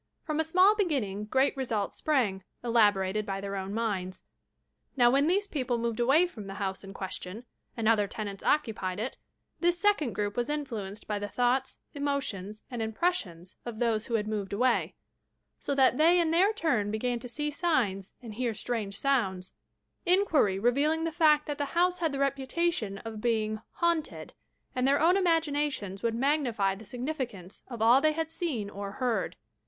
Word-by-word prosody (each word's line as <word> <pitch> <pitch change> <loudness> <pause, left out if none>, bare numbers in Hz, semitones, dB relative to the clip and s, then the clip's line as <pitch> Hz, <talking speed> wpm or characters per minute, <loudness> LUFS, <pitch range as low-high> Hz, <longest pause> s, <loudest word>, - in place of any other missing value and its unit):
Prom 305 -1 -2
a - - +3
small 370 +6 +5
beginning 255 - -1
great 265 +6 +2
results 230 -7 -2
sprang, 230 -11 +1 0.2
elaborated 210 -4 +3
by 195 -1 -3
their 200 0 -4
own 190 0 -4
minds. 200 -4 -2 0.7
Now, 240 -1 +6
when 280 +3 +3
these 395 +4 +2
people 260 -10 -2
moved 230 0 -2
away 270 +9 +5
from 215 - -8
the 195 - -7
house 195 -1 -3
in 195 - -9
question, 190 +3 -6 0.3
and 225 -2 0
other 215 -3 +4
tenants 200 -1 -6
occupied 210 -9 0
it, 240 +5 -3 0.4
this 350 0 +2
second 380 - +2
group 205 0 -2
was 240 +2 -1
influenced 225 -9 -4
by 210 -1 -1
the 205 - -3
thoughts, 250 +2 0 0.2
emotions 255 -8 -3
and 240 -2 -3
impressions 220 - -2
of 235 -2 -6
those 225 -2 0
who 235 - -1
had 210 -1 0
moved 205 -2 -3
away, 245 +4 +1 0.6
so 280 - -2
that 265 -1 +4
they 340 +3 +6
in 330 -2 +2
their 370 +5 +4
tnm 285 - 0
began 240 +3 -1
to 245 +1 -8
see 295 +4 -2
signs 240 - 0
and 225 -3 -7
hear 235 0 -2
strange 215 -3 -3
sounds, 195 -10 0 0.3
— - - -52
inquiry 335 - +3
revealing 285 +9 +2
the 330 - -1
fact 305 -2 +4
that 295 -1 -4
the 285 - +1
house 360 +1 +3
had 325 -3 +1
the 275 - -3
reputation 275 - -1
of 220 -1 -6
being 215 -2 0
"haunted," 340 -3 -1 0.4
and 255 +1 +1
their 280 +1 +4
own 340 +4 +5
imaginations 295 - 0
would 230 -1 0
magnify 240 -7 +1
the 200 +2 -11
significance 245 - -5
of 235 -4 -4
all 240 +4 +6
they 310 0 +3
had 320 0 -3
seen 315 - -2
or 200 -1 -6
heard. 250 -1 -1
240 Hz, 180 wpm, -29 LUFS, 205-300 Hz, 0.7 s, Now